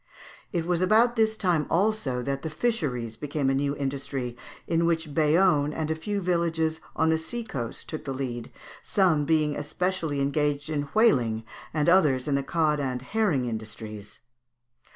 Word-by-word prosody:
It 170 -2 -1
was 175 0 0
about 225 +6 +4
this 220 -1 +2
time 175 -7 +1
also 170 - +1
that 140 +1 -2
the 160 - -4
fisheries 140 - -1
became 145 0 -1
a - - +1
new 140 +1 0
industry, 135 -3 -3 0.3
in 165 0 +1
which 165 -3 -1
Bayonne 155 -1 +3
and 160 0 -2
a - - +1
few 200 +5 -3
villages 165 -3 0
on 160 0 +3
the 160 - +2
sea 235 +9 -4
coast 120 - -5
took 155 -1 -6
the 135 - -3
lead, 125 -3 -4 0.3
some 175 -7 +2
being 155 -1 +2
especially 160 0 -2
engaged 145 +1 0
in 145 -2 -2
whaling, 125 - +3 0.3
and 150 0 0
others 155 -8 +4
in 145 - +1
the 140 - +2
cod 155 +1 +1
and 130 -3 -2
herring 200 -6 +1 0.2
fisheries 105 -1 -9
(Fig. - - -24
150 Hz, 170 wpm, -27 LUFS, 135-175 Hz, 0.3 s, about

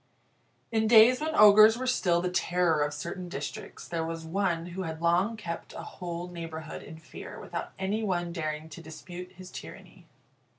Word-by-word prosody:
In 220 -1 +2
days 235 +4 +7
when 315 0 -1
ogres 215 +2 +8
were 255 - -3
still 180 -9 +2
the 180 - -1
terror 175 -3 +2
of 145 0 +1
certain 170 +5 -6
districts, 145 -3 -6
there 165 -1 -2
was 165 0 -5
one 170 -1 0
who 180 +2 -6
had 160 -3 -4
long 180 +7 +2
kept 170 -5 -6
a - - -7
whole 175 -1 -6
neighbourhood 165 -2 -7
in 160 - -10
fear 160 0 -10
without - - -6
any 195 +3 -1
one 175 -5 -1
daring 155 -2 -3
to 170 - -10
dispute 175 +3 -9
his 185 0 -11
tyranny. - - -11
175 Hz, 175 wpm, -29 LUFS, 165-200 Hz, -, ogres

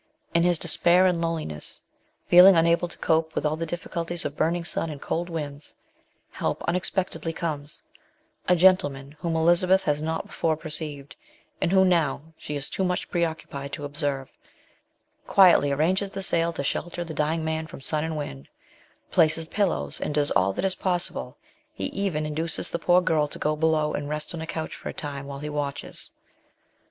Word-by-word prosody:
In 170 - +4
his 175 0 +3
despair 175 +3 +3
and 180 -2 +2
loneliness, 160 - -2 0.5
feeling 180 +2 +8
unable 170 +1 +3
to 175 - -10
cope 160 0 +1
with - - -1
all 150 +1 +1
the 165 +1 -4
difficul 170 -1 -4
ties 175 0 -1
of 145 - -3
burning 170 +2 0
sun 165 - +1
and 150 -2 -7
cold 175 +5 -3
winds, 150 -3 -6 0.6
help - - -3
unexpectedly 180 -1 -1
comes: 155 -3 -5 0.6
a 180 - +5
gentleman 145 -7 +3
whom 165 -1 -2
Elizabeth 175 +4 +4
has 150 -4 0
not 160 +1 -2
before 160 -2 -1
perceived, 150 -3 -5 0.5
and 170 - +1
whom 190 0 +5
now 160 -7 +1
she 150 - -6
is 140 -1 -4
too 190 - -2
much 180 -1 -1
preoccu 170 -2 -1
pied 140 0 -6
to 145 - -4
observe, 145 -2 -3 1.0
quietly 180 -7 +6
arranges 185 +8 +1
the 195 0 -4
sail 170 -2 +2
to 150 - -4
shelter 175 +4 -2
the 165 -2 -7
dying 155 +2 -1
man 160 0 -2
from - - -10
sun 150 +3 +1
and 160 -1 -3
wind, 70 - -6 0.6
places 160 -1 +3
pillows, 175 - -1
and 150 - -2
does 145 -1 +3
all 95 0 +3
that 95 - -2
is 190 - +4
possible; 175 - -2 0.4
he 95 - -3
even 185 -6 -2
induces 160 +2 -1
the 170 - -2
poor 180 0 +4
girl 155 -4 +1
to - - -9
go 155 0 0
below 155 -1 +1
and 145 0 -3
rest 150 +2 -4
on 165 - -5
a 160 - -5
couch 160 -1 -4
for - - -7
a - - -6
time 140 -2 -6
while 140 -1 -6
he 150 +2 -6
watches. 145 -2 -5
160 Hz, 185 wpm, -25 LUFS, 145-175 Hz, 1.0 s, feeling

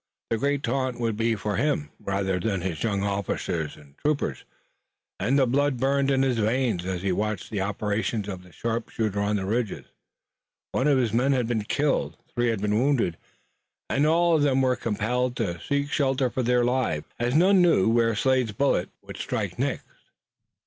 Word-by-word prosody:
The 115 - +1
great 140 +2 0
taunt 130 0 -1
would 115 -2 0
be 115 +1 +1
for 105 -1 -2
him 75 - 0
rather 95 -1 -1
than 100 0 -1
his 85 -4 -3
young 100 -3 0
officers 95 -5 -2
and 70 -2 -18
troopers, 150 -1 -1 0.7
and 125 +9 +2
the 135 - +4
blood 140 +2 +1
burned 135 +2 +1
in 135 -1 +3
his 125 -3 +1
veins 110 -4 0
as 95 -1 -3
he 100 - +1
watched 105 +1 -2
the 105 -3 -1
operations 105 +1 -1
of 95 -3 -5
the 90 0 -17
sharpshooter 110 -1 -2
on 100 +1 +1
the 95 -2 -1
ridges. 110 +1 -2 0.9
One 130 - +1
of 145 -2 +4
his 120 -5 +1
men 130 +4 +3
had 125 -3 +1
been 110 -3 -1
killed, 145 +5 0 0.2
three 120 -1 +1
had 115 -4 0
been 105 +1 +2
wounded, 125 - +2 0.8
and 145 +3 +3
all 170 +1 +4
of 155 - +2
them 135 -2 +3
were 130 -1 +3
compelled 120 +3 -1
to 85 -8 -2
seek 140 0 -1
shelter 135 -3 +1
for 130 - -1
their 125 0 +2
lives 120 -12 0
as 120 +3 0
none 185 +3 +5
knew 165 - +4
where 115 0 +3
Slade's 130 -1 +1
bullet 110 -6 +1
would - - -9
strike - - -3
next. - - -1
115 Hz, 185 wpm, -26 LUFS, 100-135 Hz, 0.9 s, none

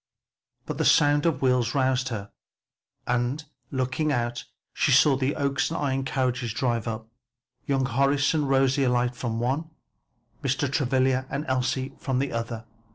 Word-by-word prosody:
But - - -5
the - - +2
sound 145 +2 +4
of 140 -5 -1
wheels 125 -2 +2
roused 130 -1 +1
her 105 -4 -5 0.7
and 125 +5 -1 0.2
looking 130 +3 -1
out 120 -2 -2 0.3
she - - +1
saw 140 +1 +6
the 130 +1 -1
Oaks 140 -2 0
and 160 - -3
Ion 135 -2 -1
carriages 125 -4 -1
drive 115 -2 -1
up, 110 0 -4 0.6
young 135 -1 +1
Horace 140 +3 +2
and 150 -3 0
Rosie 135 0 +3
alight 125 0 +1
from 120 -2 -3
the 120 - -1
one, 145 +6 -1 0.7
Mr. 135 0 0
Travilla 130 -1 +1
and 140 +2 -3
Elsie 130 +1 -1
from 130 -2 -1
the 135 +1 -1
other. 115 -1 -4
130 Hz, 160 wpm, -26 LUFS, 125-140 Hz, 0.7 s, saw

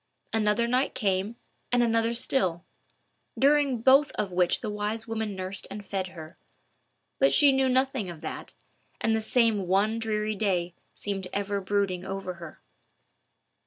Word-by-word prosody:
Another 220 +1 +2
night 255 +3 0
came, 195 +2 -1 0.4
and 245 0 +3
another 230 0 +1
still, 190 -8 +1 0.7
during 280 -4 +3
both 275 +3 +5
of 200 -3 -2
which 180 -1 +1
the 220 - -3
wise 210 +2 -3
woman 220 -2 -3
nursed 185 +1 -5
and 205 0 -8
fed 190 -2 -3
her. 165 -2 -11 0.8
But 275 - +4
she 290 -2 +6
knew 265 -1 +2
nothing 260 -5 +1
of 165 -3 -9
that, 160 - -7 0.4
and 225 0 +1
the 220 - 0
same 220 -4 +2
one 205 +5 +2
dreary 215 -1 -1
day 185 -4 -1 0.2
seemed 195 -2 -4
ever 200 0 -1
brooding 190 -2 -1
over 190 -1 -5
her. 170 -2 -10
210 Hz, 150 wpm, -27 LUFS, 190-235 Hz, 0.8 s, she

